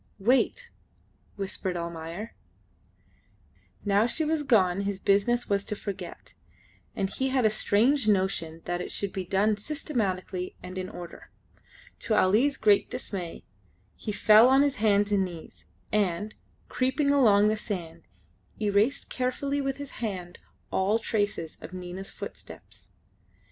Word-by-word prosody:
"Wait," 260 - +1 0.6
whispered 190 -2 -2
Almayer. 170 +5 -6 1.5
Now 205 +2 +3
she 315 +5 -1
was 315 0 0
gone 200 -9 +3
his 200 -1 -2
business 205 +6 +2
was 200 -1 +1
to 210 - -2
forget, 195 -4 -7 0.6
and 195 - 0
he 265 +7 -2
had 260 -3 +2
a 215 - +4
strange 225 +5 +2
notion 185 -5 0
that 175 0 -2
it - - -5
should 200 -1 -2
be 190 - -3
done 205 +4 +2
systematically 200 - -3
and 185 +1 -6
in 185 0 -4
order. 175 -1 -10 0.7
To 220 - 0
Ali's 225 +9 +3
great 210 -2 +3
dismay 180 -5 -5 0.5
he 215 - -5
fell 215 +3 +6
on 270 +1 +5
his 280 -2 0
hands 205 -1 +3
and 200 -2 +3
knees, 175 -3 -9 0.3
and, 205 0 0 0.3
creeping 270 +3 +1
along 210 -7 +5
the 215 - +1
sand, 175 -6 -5 0.6
erased 210 +6 +2
carefully 275 +3 -1
with 270 -1 -2
his 285 -1 -7
hand 185 -5 -4 0.3
all 195 +4 +2
traces 205 -7 -2
of 180 - -9
Nina's 185 +1 -7
footsteps. - - -10
205 Hz, 135 wpm, -27 LUFS, 185-240 Hz, 1.5 s, fell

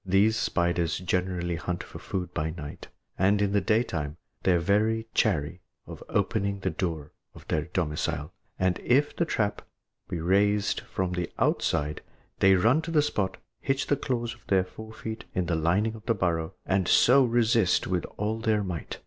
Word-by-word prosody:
These 100 +4 +3
spiders 85 -5 0
generally 90 -1 -1
hunt 90 +1 -3
for - - -10
food 90 -2 -4
by 80 -1 -1
night, 80 -3 -8 0.3
and 100 +2 +4
in 100 -1 +1
the 100 0 +2
daytime 90 -8 0 0.2
they 95 - +3
are - - +4
very 105 +6 +1
chary 85 -3 +1 0.2
of - - -10
opening 100 -1 0
the 95 - 0
door 80 -3 -3 0.2
of - - -14
their 75 -1 0
domicile, 75 -3 -2 0.2
and 95 -1 +1
if 140 +4 +2
the 170 - +1
trap 105 -10 -1 0.5
be 90 - -3
raised 100 +4 +2
from 95 -1 -3
the 90 -1 -2
outside, 75 +1 0 0.4
they 95 0 +6
run 115 - +4
to 165 - -7
the 155 -3 +3
spot, 95 -10 -1 0.2
hitch 135 +2 0
the 145 - +2
claws 120 -4 -2
of 120 - -20
their 95 -2 +3
fore 110 +4 -10
feet 110 0 -7
in 90 - +1
the 85 - 0
lining 90 +8 +1
of 110 -1 -12
the 115 - +3
burrow, 85 -4 -1
and 95 -1 +1
so 135 +3 +6
resist 115 -5 +3
with 90 -2 -1
all 110 +2 -1
their 110 -2 +1
might. 90 -4 -5
95 Hz, 180 wpm, -27 LUFS, 85-110 Hz, 0.5 s, they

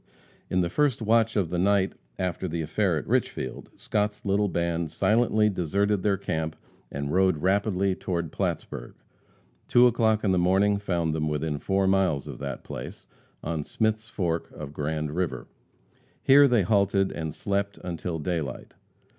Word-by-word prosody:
In 90 - +2
the 85 - 0
first 145 -2 +2
watch 115 0 +2
of 95 -6 0
the 90 - -1
second 85 - +1
night 100 -1 +2 0.2
after 90 0 -2
the 85 -1 -2
affair 85 +2 +1
at 75 - -5
Richfield, 65 - -2
Scott's 105 +1 -2
little 100 +1 +2
band 85 -2 -1
silently 110 +4 +2
deserted 100 +2 0
their 100 -1 +1
camp 80 -4 -3 0.4
and 70 +1 -3
rode 95 -2 +3
rapidly 100 0 +2
toward 85 -4 -3
Plattsburg. - - -4 0.7
Two 120 0 +6
o'clock 110 -3 +3
in 100 - +2
the 90 - +3
morning 95 +3 +3
found 85 -5 -1
them 75 -1 -1
within 75 0 -2
four 95 +3 +1
miles 95 -7 +2
of - - -7
that - - -5
place, - - -8 0.4
on 80 -1 -2
Smith's 110 +5 -1
fork 85 -7 -2
of 75 -1 -8
Grand 75 0 -2
river. 90 0 -2 0.8
Here 140 +1 +7
they 120 -6 +3
halted 100 0 +2
and 80 -2 -4
slept 100 +4 -2
until 85 -1 -4
daylight. 80 -5 -4
95 Hz, 160 wpm, -26 LUFS, 80-105 Hz, 0.8 s, Here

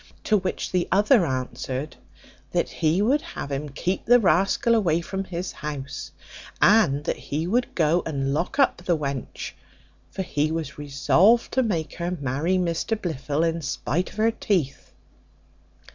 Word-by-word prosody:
To 215 - +3
which 190 -1 -3
the 180 -1 +1
other 205 +1 +4
answered, 130 +2 -4 0.6
"That - - +1
he 165 +5 +1
would 275 +7 +3
have 140 - -7
him 140 +2 -3
keep 175 +7 -2
the 245 +2 +6
rascal 195 +4 +3
away 175 -8 +2
from 190 +3 -4
his 180 0 -4
house, 140 -2 -6 0.5
and 170 -10 +4
that - - -2
he 155 +3 -3
would 240 +7 0
go 165 +1 +3
and 135 -3 -1
lock 170 - -2
up 275 - +4
the 175 -1 0
wench; 140 -3 -4 0.6
for 190 - -4
he 150 -2 -1
was 160 -3 -4
resolved 170 - +3
to 260 - +2
make 175 -10 -1
her 170 0 -2
marry 145 +7 0
Mr 180 +5 -1
Blifil 150 -4 -2
in 165 0 0
spite 150 +4 -2
of - - -15
her 225 +1 +3
teeth." 175 - -2
170 Hz, 160 wpm, -24 LUFS, 145-195 Hz, 0.6 s, the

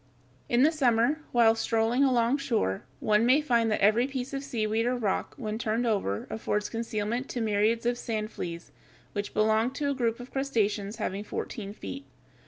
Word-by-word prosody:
] 130 0 -33
In 245 - +5
the 310 - +5
summer, 260 -1 +2
while 230 -2 +5
strolling 225 +3 +1
alongshore, 240 - +1 0.2
one 210 +1 +3
may 255 +5 +5
find 235 -6 +2
that 215 - 0
every 215 +5 +4
piece 265 -1 -5
of 275 0 -3
seaweed 225 -2 0
or 250 - +1
rock 215 -6 -2
when 215 -4 -4
turned 230 +1 0
over 195 - 0
affords 210 -1 -1
concealment 230 +2 -3
to 245 - -3
myriads 220 +1 +1
of 240 0 0
"sand 215 -1 -3
fleas" 170 -1 -6 0.4
which 205 0 -4
belong 220 +2 +3
to 285 0 -1
a - - +1
group 235 -3 -1
of 245 +1 -10
crustaceans 215 -6 -1
having 205 -2 -3
fourteen 205 -1 -5
feet. 135 - -8
225 Hz, 180 wpm, -28 LUFS, 210-245 Hz, 0.4 s, In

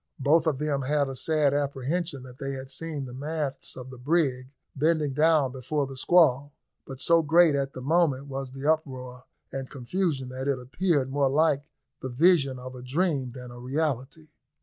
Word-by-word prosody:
Both 155 +4 +3
of 150 -4 +1
them 145 -1 -1
had 140 +1 +1
a 135 - -5
sad 150 +1 +2
apprehension 145 +2 -2
that 130 +1 -13
they 135 -1 -3
had 135 0 -7
seen 150 -1 -5
the 125 - -9
masts 145 0 -4
of 130 0 -8
the 130 - -11
brig 130 -3 0 0.3
bending 150 -1 +1
down 150 -2 +3
before 140 +3 -2
the 135 0 -8
squall, 145 -2 +3 0.3
but 135 -1 -8
so 165 +4 +4
great 165 +1 +5
at 140 -1 -1
the 130 - -7
moment 145 -3 +2
was 135 -1 -5
the 135 +2 -8
uproar 130 -5 -1 0.3
and 135 -1 -5
confusion 140 0 -2
that 130 +1 -5
it 140 -2 +1
appeared 135 +1 0
more 140 -1 +2
like 145 0 +2 0.4
the 130 - -4
vision 140 -1 +3
of 130 +1 -8
a 125 - -9
dream 135 -1 -1
than 125 -1 -9
a 120 - -10
reality. 140 +2 -3
140 Hz, 185 wpm, -27 LUFS, 130-155 Hz, 0.4 s, great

